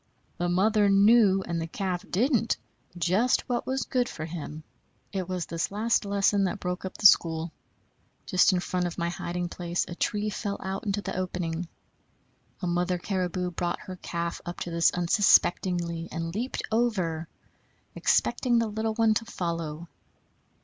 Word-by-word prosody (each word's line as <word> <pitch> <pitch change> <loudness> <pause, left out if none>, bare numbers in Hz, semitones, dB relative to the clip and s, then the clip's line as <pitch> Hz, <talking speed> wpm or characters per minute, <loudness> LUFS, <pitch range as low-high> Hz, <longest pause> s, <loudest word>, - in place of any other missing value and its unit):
The 175 0 0
mother 205 +3 +3
knew, 200 -1 +5
and 170 -1 -2
the 165 - -3
calf 180 +1 -3
didn't, 230 +2 +2 0.4
just 190 +8 +2
what 245 -2 -2
was 265 +1 0
good 250 -2 0
for 155 - -6
him. 155 -1 -7 0.5
It 190 -2 -3
was 180 -2 -2
this 165 -1 -2
last 215 +2 +1
lesson 200 0 +2
that 195 +3 -2
broke 180 0 -3
up 190 - -6
the - - -5
school. 165 -3 +5 0.7
Just 185 +2 +4
in 180 -1 +1
front 180 0 -1
of 170 - -7
my 170 0 -1
hiding 175 +1 -3
place 175 0 -2
a - - -6
tree 210 +4 -1
fell 200 0 -3
out 190 +3 -4
into 200 0 -1
the - - -4
opening. 180 -2 -3 1.0
A - - +1
mother 180 +1 0
caribou 180 -1 -2
brought 175 0 -2
her 185 -3 -7
calf 170 -1 -4
up 175 - -6
to 175 - -4
this 170 0 +4
unsuspectingly, 175 -2 +2
and 165 0 -4
leaped 240 +6 -3
over, 185 -9 0 0.7
expecting 245 -2 +2
the 230 - +3
little 220 +1 -2
one 225 -1 +4
to 225 +2 -1
follow. 170 -5 -4
180 Hz, 165 wpm, -27 LUFS, 170-210 Hz, 1.0 s, knew